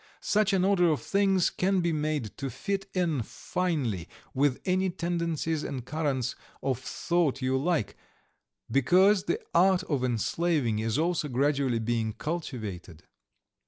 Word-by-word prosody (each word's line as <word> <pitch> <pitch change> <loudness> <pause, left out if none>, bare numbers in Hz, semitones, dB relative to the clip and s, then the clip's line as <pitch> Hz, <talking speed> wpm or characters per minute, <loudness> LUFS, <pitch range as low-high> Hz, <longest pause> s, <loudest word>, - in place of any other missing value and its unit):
Such 210 -1 +2
an 190 -1 +2
order 185 -3 +4
of 155 - +1
things 195 -2 +2
can 190 +1 +1
be 170 -2 +1
made 150 -9 -2
to 135 - -3
fit 195 - -3
in 165 -7 +1
finely 125 - -2 0.2
with 135 -1 +2
any 185 +1 +2
tendencies 170 -3 -2
and 130 -4 -5
currents 135 -5 -1 0.3
of 130 -3 0
thought 145 +1 -1
you 130 +1 +1
like, 150 - 0 0.8
because 185 +9 +4
the 410 - 0
art 185 +1 +4
of 145 -8 -1
enslaving 130 0 0
is 110 +2 -1
also 170 -1 0
gradually 140 -1 +1
being 115 -1 -1
cultivated. 110 - -5
155 Hz, 135 wpm, -28 LUFS, 130-180 Hz, 0.8 s, order